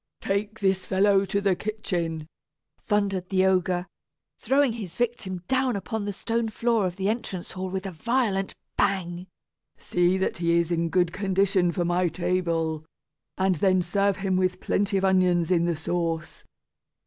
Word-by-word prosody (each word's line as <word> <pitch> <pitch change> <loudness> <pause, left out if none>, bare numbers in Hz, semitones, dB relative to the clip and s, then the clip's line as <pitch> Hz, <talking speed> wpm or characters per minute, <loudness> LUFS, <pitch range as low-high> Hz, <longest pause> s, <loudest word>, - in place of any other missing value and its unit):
"Take 205 +2 -2
this 190 -1 +2
fellow 195 +1 +3
to 200 +1 0
the 195 -2 +2
kitchen," 175 -6 -3 0.5
thundered 200 -3 -1
the 190 -1 +3
ogre, 180 -1 +1 0.5
throwing 275 -3 +2
his 205 -7 -7
victim 220 -7 -2
down 260 -2 +1
upon 205 +2 -3
the 205 - -2
stone 230 +3 -2
floor 225 -2 +1
of 175 - -5
the 195 0 -2
entrance 205 -5 -3
hall 185 0 -4
with 190 +1 -4
a 195 - -3
violent 210 0 0 0.2
bang; 180 -2 0 0.5
"see 175 +1 +1
that 190 - -1
he 170 -1 +2
is 170 0 +1
in 170 0 0
good 175 0 +1
condition 190 -2 +2
for 175 +1 -1
my 175 +1 +2
table, 165 -3 -1 0.5
and 190 -2 +2
then 185 +1 +3
serve 200 +2 +1
him 190 -1 0
with 185 -1 0
plenty 200 0 0
of 195 - +1
onions 180 -3 +3
in 170 -2 +3
the 170 -1 0
sauce. 165 +1 -3
190 Hz, 160 wpm, -26 LUFS, 175-200 Hz, 0.5 s, fellow